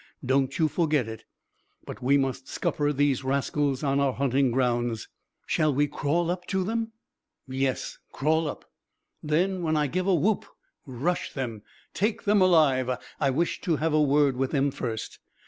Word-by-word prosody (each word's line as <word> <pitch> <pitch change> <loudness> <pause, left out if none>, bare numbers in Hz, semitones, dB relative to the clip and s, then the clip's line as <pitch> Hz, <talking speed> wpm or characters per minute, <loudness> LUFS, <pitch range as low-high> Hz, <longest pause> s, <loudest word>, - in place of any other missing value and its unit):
Don't 135 +1 +1
you 160 - +3
forget 150 -5 +1
it. 110 0 -8 0.6
But - - -8
we 135 +3 +4
must 135 -1 -2
scupper 145 0 -1
these 140 -2 +1
rascals 140 +1 0
on 140 -1 +1
our 140 -2 +2
hunting 135 0 +2
grounds." 120 -2 0 0.4
"Shall 155 -3 +1
we 145 +2 +3
crawl 155 +4 0
up 180 0 -5
to 190 -1 0
them?" 225 +2 -2 0.5
"Yes, 130 0 -2
crawl 160 +3 +1
up. - - -6 0.6
Then 180 +5 0
when 160 -2 +1
I 150 - +2
give 180 +7 -2
a 190 - +4
whoop 200 +6 +1 0.4
rush 140 +8 -2
them. 120 -6 -4 0.3
Take 210 +2 -1
them 205 -1 +3
alive. 150 -8 +4 0.3
I 140 - +2
wish 165 +6 0
to 170 - +1
have 160 +1 0
a 155 - +4
word 145 -2 +3
with 135 0 0
them 140 -1 +1
first. 115 -4 -5
145 Hz, 165 wpm, -27 LUFS, 130-165 Hz, 0.6 s, we